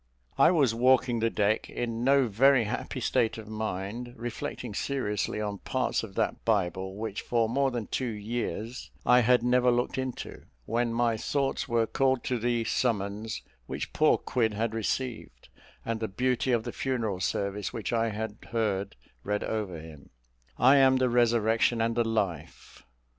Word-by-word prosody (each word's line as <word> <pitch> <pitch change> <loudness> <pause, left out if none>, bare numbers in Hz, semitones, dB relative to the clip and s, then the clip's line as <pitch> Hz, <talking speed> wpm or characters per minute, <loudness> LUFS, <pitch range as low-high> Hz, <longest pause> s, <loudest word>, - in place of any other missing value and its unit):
I - - +6
was 145 -10 +3
walking 125 0 +3
the 115 +1 +2
deck, 105 0 0
in 115 -1 -3
no 135 0 +4
very 125 +4 +4
happy 105 - -4
state 115 - +1
of 110 -1 -9
mind, 110 +3 -4
reflecting 120 0 -5
seriously 105 -7 -2
on 105 -2 -3
parts 130 -1 -1
of 100 -4 -9
that - - -1
Bible 95 -3 0
which 110 -1 -4
for 115 -2 +1
more 135 +4 +1
than 120 -4 -3
two 130 - -2
years 115 +2 -4 0.2
I 125 0 +6
had 125 0 +4
never 125 0 +3
looked 125 +2 0
into, 130 -2 -5 0.2
when 120 +1 0
my 115 -1 +1
thoughts 135 +4 -1
were 115 -1 +2
called 130 +2 +1
to 125 -2 -1
the 120 0 0
summons 110 -2 -1 0.2
which - - -5
poor - - +4
Quid 110 -4 0
had 110 +1 -1
received, 115 - -4 0.4
and 115 -1 -2
the 110 - -2
beauty 125 +5 0
of 115 -2 +2
the - - -5
funeral 115 -8 -2
service 100 +2 -2
which 110 -2 -4
I 115 0 +2
had 110 0 -4
heard 100 -4 -1 0.3
read 105 0 -1
over 100 -7 -3
him 80 -3 -12 0.5
"I 130 +3 +6
am 130 -1 +5
the 130 -1 +2
resurrection 115 -1 +3
and 115 +1 +1
the 120 - +3
life." 100 - -4
115 Hz, 165 wpm, -28 LUFS, 105-125 Hz, 0.5 s, I